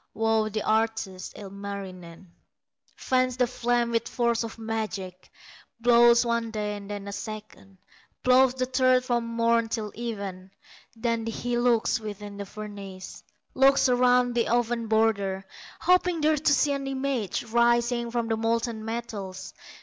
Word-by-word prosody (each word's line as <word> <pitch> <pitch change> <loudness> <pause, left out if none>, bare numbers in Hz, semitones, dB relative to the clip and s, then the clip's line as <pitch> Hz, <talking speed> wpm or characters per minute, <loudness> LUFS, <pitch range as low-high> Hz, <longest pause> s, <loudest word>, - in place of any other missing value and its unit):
Wow 220 -1 +1
the 215 0 -3
artist, 220 -4 -1
Ilmarinen, 195 -3 -8 0.7
Fans 255 -1 0
the 250 - +3
flame 240 -1 0
with 230 0 0
force 235 -1 0
of 225 0 -7
magic, 215 -5 -5 0.5
Blows 235 0 +5
one 235 -1 0
day, 210 -1 -3
and 200 0 -9
then 205 -1 -6
a - - -5
second, 210 -2 -8 0.5
Blows 255 0 +5
the 255 -1 0
third 255 0 +3
from 240 -2 0
morn 230 0 +1
till 215 -2 -3
even; 200 -5 -6 0.5
Then 230 0 -1
he 240 +2 -2
looks 240 -2 +2
within 205 -1 -7
the 200 -1 -6
furnace, 200 -3 -9 0.3
Looks 270 +1 +5
around 250 0 +3
the 235 -1 +1
oven 240 -1 0
border, 200 -3 +1 0.4
Hoping 360 -2 +3
there 310 +1 +3
to 300 0 +1
see 285 +1 +3
an 275 -1 -2
image 265 -7 -2
Rising 235 +1 +2
from 235 -1 -1
the 225 -1 0
molten 230 0 -1
metals. 220 -5 -6
230 Hz, 140 wpm, -26 LUFS, 210-245 Hz, 0.7 s, Blows